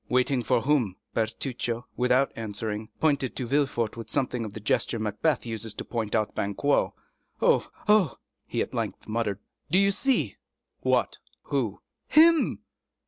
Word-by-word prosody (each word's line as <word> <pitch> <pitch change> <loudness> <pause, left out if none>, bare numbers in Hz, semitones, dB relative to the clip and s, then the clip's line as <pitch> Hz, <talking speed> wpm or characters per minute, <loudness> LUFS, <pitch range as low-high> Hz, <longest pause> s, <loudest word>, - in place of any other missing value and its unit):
"Waiting 125 +1 +2
for 120 +1 +2
whom?" 130 -9 +2 0.2
Bertuccio, 120 +1 -2
without 125 +2 +3
answering, 110 0 -4
pointed 140 -5 +1
to 130 - -2
Villefort 120 -4 0
with 115 -1 -8
something 125 -2 -1
of 105 -2 -6
the 110 - -6
gesture 110 +2 +1
Macbeth 110 +8 0
uses 115 -2 -3
to - - -5
point 115 -3 -2
out 110 -1 0
Banquo. 100 +9 +1 0.4
"Oh, - - +3 0.2
oh!" 210 - +4 0.3
he - - 0
at - - -10
length - - -3
muttered, 110 -3 -1 0.3
"do 175 - +3
you 200 +1 +5
see?" 265 +6 +1 0.4
"What? - - +1 0.2
Who?" - - -2 0.3
"Him!" 325 +1 +5
120 Hz, 145 wpm, -27 LUFS, 110-140 Hz, 0.4 s, you